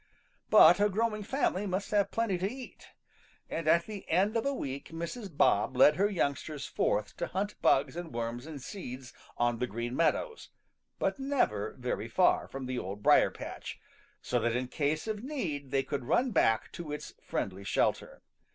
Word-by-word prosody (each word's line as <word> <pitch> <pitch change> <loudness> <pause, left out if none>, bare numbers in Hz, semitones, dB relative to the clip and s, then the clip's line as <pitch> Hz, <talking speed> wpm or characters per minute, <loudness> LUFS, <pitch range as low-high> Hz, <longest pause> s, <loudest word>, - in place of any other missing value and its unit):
But - - +8
a 205 +1 +4
growing 215 +1 0
family 205 -4 0
must 190 +2 -2
have 205 -1 +2
plenty 225 -6 0
to 195 +3 -1
eat, 255 -1 -10 0.6
and 165 -1 -3
at 170 +2 +4
the 210 -3 -8
end 195 +7 +2
of 230 +4 +1
a - - +2
week 140 - -5
Mrs. 170 +7 -5
Bob 130 -3 +2
led 150 +4 +7
her 200 +2 +3
youngsters 145 -5 -2
forth 105 0 -1
to 170 - -2
hunt 205 +3 -3
bugs 135 +1 +3
and 175 -1 -6
worms 120 +3 -4
and 155 -3 -7
seeds 130 -5 -8 0.2
on 120 -1 +1
the 125 - 0
Green 120 +3 -4
Meadows, 455 - 0 0.5
but - - -1
never 265 - 0
very 125 -3 -3
far 180 +10 +3
from 135 -1 -6
the 125 -1 -2
Old 100 +1 -6
Briar - - +6
patch, - - -8 0.4
so 125 - 0
that 115 0 0
in 125 0 -2
case 150 +2 -1
of 215 0 -3
need 170 - -4
they 135 0 +1
could 140 -3 -4
run 250 - +2
back 110 - +2
to 165 -3 -7
its 150 - -6
friendly 95 +1 -3
shelter. - - -1
155 Hz, 180 wpm, -30 LUFS, 125-205 Hz, 0.6 s, But